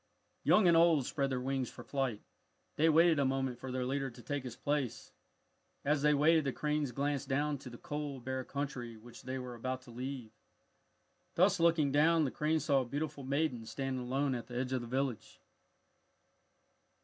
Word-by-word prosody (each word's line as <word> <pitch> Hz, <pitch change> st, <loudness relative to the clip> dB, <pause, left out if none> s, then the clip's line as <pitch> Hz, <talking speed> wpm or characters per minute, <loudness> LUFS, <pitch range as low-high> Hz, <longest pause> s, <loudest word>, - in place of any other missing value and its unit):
Young 210 Hz, -4 st, +5 dB
and 170 Hz, -, +6 dB
old 165 Hz, -5 st, +5 dB
spread 140 Hz, 0 st, -1 dB
their 130 Hz, -1 st, -1 dB
wings 130 Hz, -1 st, -1 dB
for -, -, -11 dB
flight. 135 Hz, -6 st, -2 dB, 0.5 s
They 160 Hz, +2 st, +4 dB
waited 165 Hz, 0 st, +5 dB
a -, -, +3 dB
moment 135 Hz, -2 st, -1 dB
for 130 Hz, -, -6 dB
their 130 Hz, 0 st, -1 dB
leader 135 Hz, +1 st, -1 dB
to 120 Hz, 0 st, -13 dB
take 145 Hz, -2 st, -3 dB
his 125 Hz, -2 st, -6 dB
place. 145 Hz, -5 st, -2 dB, 0.7 s
As 145 Hz, 0 st, +2 dB
they 150 Hz, 0 st, +4 dB
waited 160 Hz, +2 st, +4 dB
the 135 Hz, -, 0 dB
cranes 150 Hz, -1 st, -1 dB
glanced 140 Hz, +1 st, -2 dB
down 145 Hz, +1 st, 0 dB
to 130 Hz, -, -9 dB
the 120 Hz, -, -10 dB
cold, 145 Hz, -4 st, -5 dB
bare 130 Hz, 0 st, -2 dB
country 135 Hz, -5 st, -5 dB
which 115 Hz, +2 st, -13 dB
they 130 Hz, 0 st, -4 dB
were 125 Hz, -1 st, -6 dB
about 130 Hz, +2 st, -4 dB
to 125 Hz, -, -13 dB
leave. 125 Hz, -1 st, -6 dB, 1.0 s
Thus -, -, +4 dB
looking 165 Hz, -4 st, +3 dB
down, 160 Hz, +3 st, +4 dB
the 130 Hz, -, -2 dB
cranes 155 Hz, +1 st, 0 dB
saw 140 Hz, -3 st, +3 dB
a -, -, -3 dB
beautiful 145 Hz, +2 st, -4 dB
maiden 140 Hz, -3 st, 0 dB
standing 135 Hz, 0 st, -3 dB
alone 135 Hz, +2 st, 0 dB
at 120 Hz, -2 st, -4 dB
the 120 Hz, -, -6 dB
edge 130 Hz, +1 st, -1 dB
of 130 Hz, -, 0 dB
the 120 Hz, -, -7 dB
village. 130 Hz, -2 st, -3 dB
135 Hz, 190 wpm, -33 LUFS, 125-150 Hz, 1.0 s, and